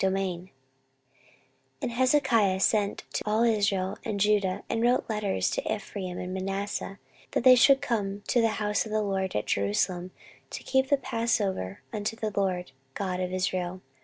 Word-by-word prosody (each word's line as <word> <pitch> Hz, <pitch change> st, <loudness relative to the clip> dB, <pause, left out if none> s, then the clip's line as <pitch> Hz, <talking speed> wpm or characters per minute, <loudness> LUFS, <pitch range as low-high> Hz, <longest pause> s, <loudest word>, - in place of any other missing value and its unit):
14:030:001 190 Hz, -2 st, -1 dB, 1.3 s
And -, -, -1 dB
Hezekiah 240 Hz, -6 st, +3 dB
sent 205 Hz, 0 st, +1 dB
to -, -, -1 dB
all 215 Hz, +2 st, +2 dB
Israel 205 Hz, -4 st, +1 dB
and 210 Hz, -3 st, -3 dB
Judah, 200 Hz, -2 st, +2 dB
and 230 Hz, -, -1 dB
wrote 245 Hz, +2 st, +2 dB
letters 210 Hz, -3 st, 0 dB
also -, -, -1 dB
to -, -, -1 dB
Ephraim 185 Hz, -3 st, -6 dB
and 180 Hz, 0 st, -5 dB
Manasseh, 195 Hz, +1 st, -3 dB, 0.4 s
that -, -, +1 dB
they 255 Hz, 0 st, +9 dB
should 270 Hz, +2 st, +6 dB
come 205 Hz, -4 st, -1 dB
to 245 Hz, -, +2 dB
the 230 Hz, -, +4 dB
house 210 Hz, -1 st, 0 dB
of -, -, -9 dB
the 215 Hz, 0 st, +1 dB
LORD 190 Hz, -2 st, -2 dB
at 105 Hz, -, 0 dB
Jerusalem, 175 Hz, -, 0 dB, 0.4 s
to -, -, -7 dB
keep 265 Hz, 0 st, +1 dB
the 285 Hz, -, +4 dB
passover 225 Hz, -, -1 dB
unto 215 Hz, +1 st, -2 dB
the 220 Hz, -1 st, -3 dB
LORD 185 Hz, -5 st, -1 dB, 0.2 s
God 185 Hz, -2 st, -2 dB
of 180 Hz, 0 st, -2 dB
Israel. 185 Hz, 0 st, -2 dB
200 Hz, 165 wpm, -28 LUFS, 185-230 Hz, 1.3 s, they